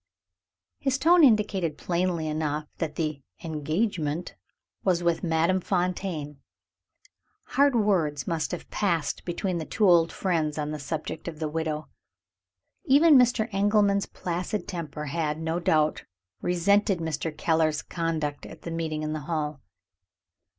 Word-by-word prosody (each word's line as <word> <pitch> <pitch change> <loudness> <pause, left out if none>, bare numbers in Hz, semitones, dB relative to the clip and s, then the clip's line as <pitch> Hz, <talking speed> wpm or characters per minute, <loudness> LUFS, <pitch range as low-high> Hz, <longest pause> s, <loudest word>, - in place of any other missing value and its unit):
His 265 -1 0
tone 335 +4 +5
indicated 205 - +3
plainly 175 -2 -1
enough 150 -1 -2
that 155 -3 -2
the 155 -3 -2 0.2
"engagement" 160 +1 -2 0.5
was 175 -2 +2
with 170 -1 +1
Madame 170 +2 +2
Fontaine. 175 -5 -2 1.1
Hard 280 0 +3
words 180 -10 +1
must 165 -2 -1
have 175 - -5
passed 170 -7 0
between 175 0 -2
the 160 - -4
two 210 +5 +1
old 170 -2 +5
friends 160 -5 -1
on 150 0 -2
the 155 - -4
subject 160 +3 -5
of 165 -2 -5
the 155 0 -2
widow. 155 0 -3 1.0
Even 300 +2 +6
Mr. 245 -3 +4
Engelman's 200 0 +3
placid 180 +4 -3
temper 155 -4 -5
had, 150 +1 -2
no 160 +1 -1
doubt, 155 -4 +1 0.4
resented 195 +3 +2
Mr. 160 -1 -3
Keller's 160 -2 +1
conduct 160 -4 -3
at - - -12
the 170 - -5
meeting 160 -2 -2
in 155 0 -2
the 155 - -3
hall. 150 -3 -2
165 Hz, 135 wpm, -27 LUFS, 155-190 Hz, 1.1 s, Even